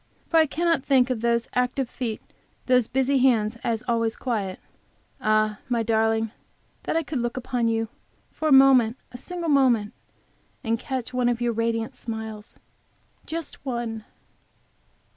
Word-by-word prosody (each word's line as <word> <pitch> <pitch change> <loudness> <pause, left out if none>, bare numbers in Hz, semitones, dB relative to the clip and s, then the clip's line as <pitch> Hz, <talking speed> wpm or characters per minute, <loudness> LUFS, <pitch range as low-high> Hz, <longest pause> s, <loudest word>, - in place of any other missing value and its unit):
For 330 - +3
I 320 -1 +5
cannot 330 -1 +1
think 260 -2 +3
of 235 -3 -2
those 235 0 +1
active 250 +1 0
feet, 235 -3 -4 0.4
those 250 -3 +3
busy 265 +1 +1
hands 235 -3 +2
as 230 0 -1
always 230 -1 +1
quiet. 205 -7 -3 0.6
Ah, 215 -1 +2
my 235 -2 +1
darling, 225 0 +1 0.5
that - - 0
I 330 - +1
could 285 -2 -3
look 240 +1 -2
in - - -2
upon 245 -2 -1
you 225 0 0 0.4
for 315 - -3
a - - +2
moment, 265 -3 +6
a 245 - -8
single 350 +4 -5
moment, 245 -7 +3 0.7
and 230 -1 0
catch 255 -1 -4
one 250 -1 +2
of 240 -1 -1
your 240 -1 0
radiant 230 0 -1
smiles; 220 -2 -7 0.7
just 330 -3 -6
one! 235 -4 -3
240 Hz, 155 wpm, -25 LUFS, 225-265 Hz, 0.7 s, moment